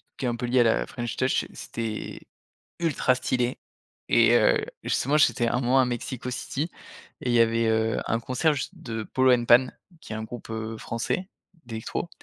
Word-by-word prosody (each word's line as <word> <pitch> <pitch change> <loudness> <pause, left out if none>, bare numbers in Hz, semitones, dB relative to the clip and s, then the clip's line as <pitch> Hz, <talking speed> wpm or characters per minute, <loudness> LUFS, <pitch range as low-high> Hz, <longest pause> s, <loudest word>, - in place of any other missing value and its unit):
qui - - -4
est - - +2
un 120 - -2
peu 125 - -3
liée 125 +1 +3
à - - +6
la 115 -1 +2
French 120 -2 -5
touch 130 0 +1
c'était, 115 -2 -5 0.6
ultra 160 -6 +2
stylé. 125 -1 -1 0.5
Et - - +5
heu, - - +4 0.3
justement 145 +4 +1
j'étais 120 -5 +3
1 120 - 0
mois 130 +2 +4
à - - +3
Mexico 125 +1 -4
City 145 +6 -3 0.5
et 125 - -2
il - - +1
y 120 - +6
avait, 115 0 +2
heu, 110 0 +1
un 115 - +1
concert 130 +6 +1
juste 135 -4 -4
de 115 -2 -5
Polo& 130 +3 +3
Pan, 120 +2 +6 0.3
qui - - -8
est - - -4
un 110 - -4
groupe, 115 +1 -9
heu, 110 0 -4
français, 115 +12 -3 0.4
d'électro. 115 +8 -4
120 Hz, 190 wpm, -26 LUFS, 115-130 Hz, 0.6 s, à